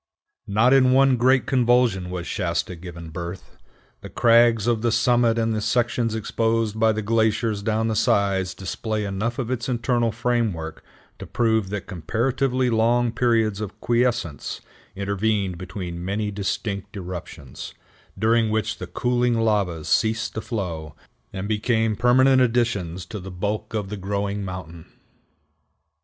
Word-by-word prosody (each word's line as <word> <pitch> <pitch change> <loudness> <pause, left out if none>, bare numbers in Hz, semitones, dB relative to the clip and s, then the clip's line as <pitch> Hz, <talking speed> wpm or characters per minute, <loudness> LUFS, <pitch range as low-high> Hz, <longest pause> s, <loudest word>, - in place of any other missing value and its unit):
Not 110 +6 +3
in 130 -1 +5
one 135 0 +5
great 130 +2 +3
convulsion 120 -7 +2
was 90 -1 -4
Shasta 90 -1 -2
given 85 -1 -9
birth. 85 +3 -7 0.5
The - - -9
crags 115 -2 +4
of 120 -2 +1
the 120 0 +1
summit 120 -1 +3
and 115 -1 +1
the 110 - -1
sections 115 0 0
exposed 110 0 0
by 110 0 +4
the 110 0 -3
glaciers 110 -1 +1
down 110 +1 0
the 110 - -1
sides 100 -5 +1
display 105 +3 -3
enough 105 +4 -2
of 125 -2 -3
its 125 -1 -2
internal 120 -1 +1
framework 110 -9 -2 0.4
to - - -8
prove 110 -4 +1
that 105 -2 -4
comparatively 125 - 0
long 120 +1 +2
periods 115 -4 +1
of 105 -2 -6
quiescence 120 - -1 0.4
intervened 100 -2 -1
between 90 -2 -6
many 105 +3 -2
distinct 100 0 -3
eruptions, 85 -7 -8 0.4
during 110 +2 +2
which 110 0 -1
the 90 - -6
cooling 120 +4 +1
lavas 100 -8 0
ceased 110 +1 +1
to 110 - -4
flow, 85 - -5 0.4
and 95 +1 -5
became 110 0 +1
permanent 130 +3 +4
additions 115 -8 0
to 105 +2 -7
the 95 +1 -8
bulk 100 +4 -3
of 105 -3 -2
the 105 - -5
growing 100 +1 -2
mountain. 90 -3 -8
110 Hz, 145 wpm, -23 LUFS, 95-120 Hz, 0.5 s, in